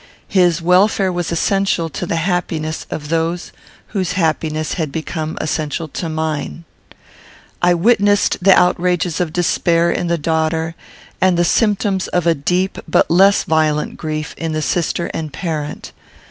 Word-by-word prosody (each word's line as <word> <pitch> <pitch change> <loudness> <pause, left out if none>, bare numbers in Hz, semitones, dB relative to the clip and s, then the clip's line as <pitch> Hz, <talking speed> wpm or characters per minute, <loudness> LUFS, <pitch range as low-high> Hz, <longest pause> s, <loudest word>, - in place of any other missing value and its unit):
His 175 -3 +3
welfare 185 +2 +3
was 175 -1 -3
essential 190 0 +1
to 175 +3 -5
the - - -1
happiness 165 -2 -2
of 150 -1 -6
those 165 +2 -1 0.4
whose 185 -4 -2
happiness 155 -3 -1
had 155 -5 -3
become 160 +1 -4
essential 155 +1 -2
to 165 +3 -4
mine. 160 +1 -3 1.0
I 175 0 +4
witnessed 205 +1 +3
the 190 0 +7
outrages 180 -2 +1
of 170 -3 -1
despair 170 0 +1
in 175 - -1
the 170 0 +1
daughter, 160 +1 -1 0.5
and 185 -2 +3
the 175 - +3
symptoms 200 -1 +1
of 175 -2 -1
a 170 - +4
deep 180 +6 -1
but 160 - +2
less 195 +4 +5
violent 155 -1 0
grief 155 -1 -4
in 165 -1 -2
the 155 0 -1
sister 170 0 -1
and 155 -2 -4
parent. 150 -1 -5
170 Hz, 145 wpm, -18 LUFS, 155-180 Hz, 1.0 s, the